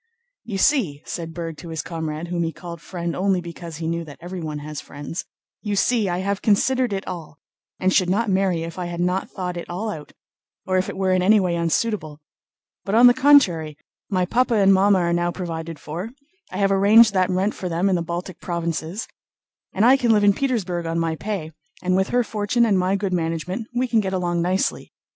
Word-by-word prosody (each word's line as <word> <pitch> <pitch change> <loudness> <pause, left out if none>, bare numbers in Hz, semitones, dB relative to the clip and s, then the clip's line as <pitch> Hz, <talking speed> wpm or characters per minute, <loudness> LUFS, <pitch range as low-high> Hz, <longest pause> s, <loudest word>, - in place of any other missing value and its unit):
"You 205 -4 -4
see," 190 - +2
said 165 -2 -5
Berg 165 -1 -6
to 170 - -9
his 160 0 -4
comrade, 160 0 -5
whom 175 -1 -1
he 165 -1 -1
called 170 -1 -9
"friend" 170 -2 -4
only 190 0 +1
because 170 -2 -8
he 165 - -5
knew 170 0 -2
that 145 -2 -11
everyone 170 -4 -5
has 150 0 -6
friends, 145 +4 -7 0.4
"you 205 -2 -2
see, 220 -1 +2
I 175 - -1
have 200 +1 -2
considered 250 +3 +2
it 195 0 -3
all, 160 -4 -7 0.4
and 185 0 +2
should 185 -2 +3
not 215 +5 +1
marry 190 -4 +1
if 165 +2 -7
I 180 - -3
had 170 0 -5
not 180 +2 0
thought 180 -2 -4
it 170 - -7
all 205 +5 -3
out 150 -6 -9 0.5
or 185 -1 +2
if 185 - -2
it - - -6
were 190 -1 +1
in 185 0 +3
any 210 +4 +5
way 180 -3 0
unsuitable. 170 -2 -1 0.6
But 200 - -1
on 240 +2 +7
the 245 - +9
contrary, 220 - +4 0.3
my 185 -2 +1
papa 240 +5 +1
and 195 -2 +5
mamma 195 +1 +4
are 170 -1 +1
now 175 0 +1
provided 165 -3 -5
for—I 265 - -9
have 195 -1 +2
arranged 205 +3 +6
that 185 -1 +2
rent 190 +3 +1
for 185 - -5
them 170 +3 +1
in 195 - +2
the 175 - 0
Baltic 175 +2 -5
Provinces—and 170 +4 -4
I 260 +3 +7
can 240 -4 +2
live 210 -1 +3
in 200 0 +6
Petersburg 190 -10 -1
on 165 0 -2
my 165 -1 0
pay, 190 -4 -4 0.3
and 185 0 +2
with 190 +1 +2
her 245 0 +2
fortune 215 +2 +1
and 200 -4 +2
my 185 +2 +1
good 195 -1 -2
management 175 +5 -2
we 250 +1 0
can 230 -2 +2
get 190 -2 -2
along 175 -2 0
nicely. 185 +3 -1
185 Hz, 210 wpm, -22 LUFS, 170-205 Hz, 0.6 s, the